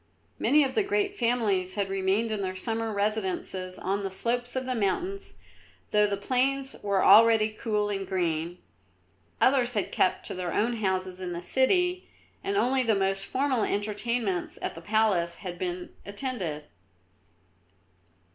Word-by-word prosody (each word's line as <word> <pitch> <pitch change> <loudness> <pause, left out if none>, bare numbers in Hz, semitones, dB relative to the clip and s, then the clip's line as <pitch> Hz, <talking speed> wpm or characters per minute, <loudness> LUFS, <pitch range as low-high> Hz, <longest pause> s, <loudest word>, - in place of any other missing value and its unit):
Many 300 +1 +4
of 265 -1 -1
the - - +3
great 405 0 0
families 215 - +1
had 200 -2 0
remained 195 +4 0
in 210 -2 -2
their 185 -1 -3
summer 225 +3 -2
residences 190 -3 -1
on 195 +2 -1
the 195 - -3
slopes 240 +6 -2
of 260 0 -1
the 255 - -1
mountains, 300 - -2 0.6
though 210 0 +4
the 200 -1 -2
plains 265 +5 0
were 200 -2 +1
already 220 +1 +7
cool 215 -1 -1
and 195 -1 -3
green; 170 -2 -1 0.8
others 250 -3 +3
had 205 - -1
kept 185 - +1
to - - -4
their 180 -2 -3
own 235 +2 +1
houses 185 -3 -1
in 180 -1 -4
the 170 - -5
city, 360 - +1 0.3
and 395 +1 -1
only 260 -5 +2
the 230 -4 +2
most 195 0 0
formal 260 -2 0
entertainments 210 -2 -1
at - - -2
the 165 - -10
palace 195 -4 +1
had 175 -3 -7
been 180 0 -4
attended. 200 - -4
210 Hz, 155 wpm, -27 LUFS, 190-245 Hz, 0.8 s, already